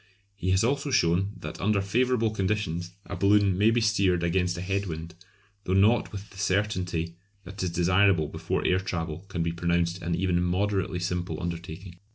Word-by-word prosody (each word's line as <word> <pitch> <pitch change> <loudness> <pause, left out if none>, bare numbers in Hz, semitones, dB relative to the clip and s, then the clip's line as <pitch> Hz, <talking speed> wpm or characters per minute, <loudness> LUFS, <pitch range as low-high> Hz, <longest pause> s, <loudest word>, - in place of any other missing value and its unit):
He 95 -2 -3
has 95 +2 +3
also 140 +4 0
shown 95 -3 +2
that - - -7
under 105 +1 +2
favourable 115 +3 +1
conditions 95 -4 -2
a 100 - -6
balloon 100 0 +3
may 105 +4 +4
be 115 +1 +2
steered 100 -5 +2
against 90 +1 +1
a - - -4
head 100 +2 -1
wind, 80 0 -6 0.5
though 95 - 0
not 105 +5 +3
with 100 0 -8
the 100 - -12
certainty 90 -4 -1 0.3
that 95 +2 -8
is 90 - 0
desirable 90 -1 +3
before - - -3
air 90 - +3
travel 85 -2 -4
can 90 -4 -2
be 85 - -1
pronounced 85 +1 0
an 85 0 -1
even 90 -1 +1
moderately 95 +1 0
simple 90 0 -2
undertaking. 85 +1 -6
95 Hz, 180 wpm, -27 LUFS, 85-100 Hz, 0.5 s, may